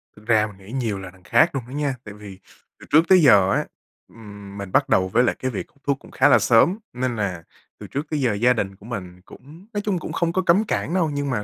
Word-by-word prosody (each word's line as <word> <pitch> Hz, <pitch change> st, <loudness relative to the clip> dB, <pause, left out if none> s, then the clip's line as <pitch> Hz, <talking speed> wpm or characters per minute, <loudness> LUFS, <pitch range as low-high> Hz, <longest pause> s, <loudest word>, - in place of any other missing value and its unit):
Thực 105 Hz, -, -18 dB
ra 110 Hz, -2 st, +3 dB
mình 100 Hz, -, -14 dB
nghĩ 105 Hz, -, -11 dB
nhiều 115 Hz, -7 st, -2 dB
là 95 Hz, -2 st, -9 dB
đằng 90 Hz, -1 st, -22 dB
khác 115 Hz, -, +4 dB
luôn 130 Hz, -, -2 dB
đó -, -, -12 dB
nha. 145 Hz, -2 st, -1 dB
Tại 105 Hz, -, -10 dB
vì 100 Hz, -2 st, -12 dB, 0.4 s
từ -, -, -13 dB
trước 160 Hz, +3 st, +5 dB
tới 185 Hz, -2 st, +6 dB
giờ 100 Hz, -10 st, +5 dB
á, -, -, 0 dB, 0.4 s
ừm, 100 Hz, -3 st, -12 dB
mình 100 Hz, -2 st, -7 dB
bắt -, -, +2 dB
đầu 95 Hz, -, +3 dB
với 115 Hz, +6 st, +2 dB
lại -, -, +1 dB
cái 130 Hz, -, -2 dB
việc 105 Hz, -, -5 dB, 0.2 s
thuốc 140 Hz, -1 st, -1 dB
cũng -, -, -17 dB
khá -, -, +3 dB
là 120 Hz, -, +6 dB
sớm 115 Hz, -, +4 dB, 0.2 s
nên 125 Hz, -1 st, -2 dB
là 90 Hz, -6 st, -3 dB, 0.4 s
từ -, -, -9 dB
trước 145 Hz, +3 st, -4 dB
tới 150 Hz, -2 st, -2 dB
giờ 120 Hz, -4 st, +1 dB
gia 120 Hz, +5 st, +3 dB
đình 100 Hz, -4 st, -3 dB
của 100 Hz, +2 st, -18 dB
mình 90 Hz, -6 st, -7 dB
cũng 160 Hz, +9 st, -15 dB
nói 205 Hz, -, -2 dB
chung 200 Hz, -4 st, -1 dB
cũng -, -, -7 dB
không 170 Hz, -1 st, -1 dB
có 185 Hz, -, +1 dB
cấm 185 Hz, +3 st, +3 dB
cản 175 Hz, -5 st, -2 dB
đâu, 175 Hz, -4 st, +1 dB
nhưng 145 Hz, -1 st, -2 dB
mà 110 Hz, -5 st, -2 dB
120 Hz, 275 wpm, -22 LUFS, 100-145 Hz, 0.4 s, tới